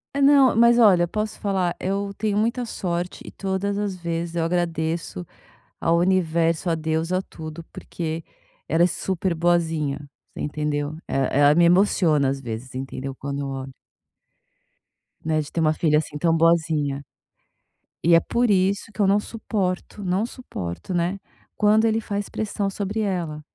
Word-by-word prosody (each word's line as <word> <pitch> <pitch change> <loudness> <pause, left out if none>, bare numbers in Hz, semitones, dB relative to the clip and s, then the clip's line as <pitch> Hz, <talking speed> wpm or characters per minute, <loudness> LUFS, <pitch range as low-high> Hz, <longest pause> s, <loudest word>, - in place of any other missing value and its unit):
Eh, 280 - +1
não, 275 -4 +6
mas 235 +1 +6
olha, 185 -6 +6
posso 215 +4 -3
falar, 185 -3 0
eu 200 +1 -2
tenho 210 -2 -1
muita 235 +3 0
sorte 175 -4 -3
e - - -8
todas 195 +1 -2
as 205 -2 -2
vezes 170 -1 -4
eu 165 - +1
agradeço 165 - -2 0.6
ao 165 +1 +3
universo, 170 -2 +1
a 165 - +2
Deus, 160 +1 -1
a 185 +1 +1
tudo, 160 -2 -9
porque 165 -1 -5 0.5
ela 165 +2 +3
é - - +6
super 185 0 -1
boazinha, 160 -4 +1 0.4
você - - -5
entendeu? 150 0 -2
E - - -7 0.3
ela 145 +1 +6
me 175 - +5
emociona 170 -5 +4
às 135 +1 -1
vezes, 120 +1 -7
entendeu? 135 +1 -5
Quando 140 +1 -4
olha 135 0 -5 1.5
Né, 155 0 +1
de 150 - -6
ter 165 - -2
uma 155 -1 +3
filha 150 -2 +2
assim, 150 -1 -4
tão 165 +1 +2
boazinha. 155 -4 +2 1.0
E 170 +1 +5
é 165 - +8
por 235 +7 0
isso 195 +2 +1
que - - -18
eu 195 - +4
não 200 +1 +4
suporto, 205 -3 -3
não 190 +4 0
suporto, 185 - -6
né? 175 +3 0 0.4
Quando 215 +2 +4
ele 225 0 +2
faz 205 -1 -4
pressão 205 -2 -2
sobre 205 +2 -3
ela 170 -7 -2
175 Hz, 160 wpm, -23 LUFS, 155-200 Hz, 1.5 s, é